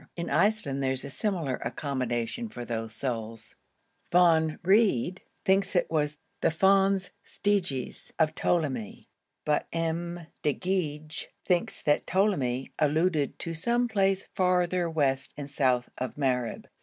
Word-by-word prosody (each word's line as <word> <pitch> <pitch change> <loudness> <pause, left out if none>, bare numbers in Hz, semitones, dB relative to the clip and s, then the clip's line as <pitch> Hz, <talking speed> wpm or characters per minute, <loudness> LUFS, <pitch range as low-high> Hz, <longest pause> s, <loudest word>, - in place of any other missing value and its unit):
In 170 - -4
Iceland 165 -4 +2
there 130 -1 +1
is 135 +1 -5
similar 165 - -1
accommodation 130 - -2
for 120 -10 -7
those 115 -1 -4
souls. 115 -3 -4 0.6
Von 165 -3 +4
Wrede 190 - +3 0.3
thinks 195 +1 +2
it 175 - +2
was 150 -2 0 0.2
the - - +4
Fons 195 +2 +3
Stygis 185 -11 -1
of 155 -1 +3
Ptolemy, 135 - -1 0.3
but 150 -1 +1
M. 170 +1 -2 0.2
de 150 -2 +1
Goeje 155 -5 -2 0.2
thinks 180 -2 0
that 145 - +2
Ptolemy 140 -10 +1
alluded 155 0 +2
to 165 - -4
some 235 +9 +1
place 195 -3 +1
farther 180 -1 +2
west 140 -4 0
and 145 -1 -6
south 125 -3 +2
of 130 0 -3
Mareb. 125 -4 -1
160 Hz, 130 wpm, -28 LUFS, 135-185 Hz, 0.6 s, Von